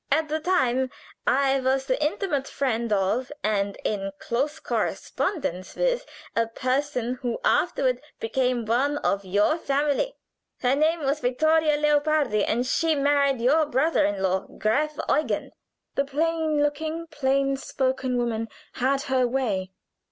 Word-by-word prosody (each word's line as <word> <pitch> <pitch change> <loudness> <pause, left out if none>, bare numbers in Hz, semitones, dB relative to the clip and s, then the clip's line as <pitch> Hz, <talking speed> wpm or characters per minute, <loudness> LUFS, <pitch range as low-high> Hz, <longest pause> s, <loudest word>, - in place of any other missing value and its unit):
At 310 +2 +2
the 310 +1 0
time 265 -7 +1 0.4
I 270 0 +3
was 265 +1 +1
the 265 +3 0
intimate 300 -3 -1
friend 235 -4 -1
of, 205 +7 +1
and 200 -1 0
in 195 -2 -1
close 285 +9 -2
correspondence 280 - -2
with, - - 0 0.3
a 230 0 +2
person 255 0 -1
who 240 -2 -1
afterward - - +2 0.2
became 255 - 0
one 265 +6 +1
of 200 -7 0
your 205 - +2
family. 290 - 0 0.5
Her 255 +1 +3
name 315 +3 +2
was 280 +1 0
Vittoria 305 +4 +2
Leopardi, 295 -6 +2
and 240 +3 0
she 325 +4 +1
married 280 -2 +2
your 295 +6 +3
brother 300 +5 +2
in 200 -1 0
law, 190 0 0
Graf 300 +8 0
Eugen." 305 - 0 0.4
The 275 - 0
plain 315 +1 0
spoken, 315 +3 -2
plain 275 -1 +1 0.3
looking 260 -1 0
woman 225 -2 -1 0.3
had 270 +2 0
her 260 -3 +2
way. 215 -8 -1
275 Hz, 135 wpm, -25 LUFS, 240-300 Hz, 0.5 s, I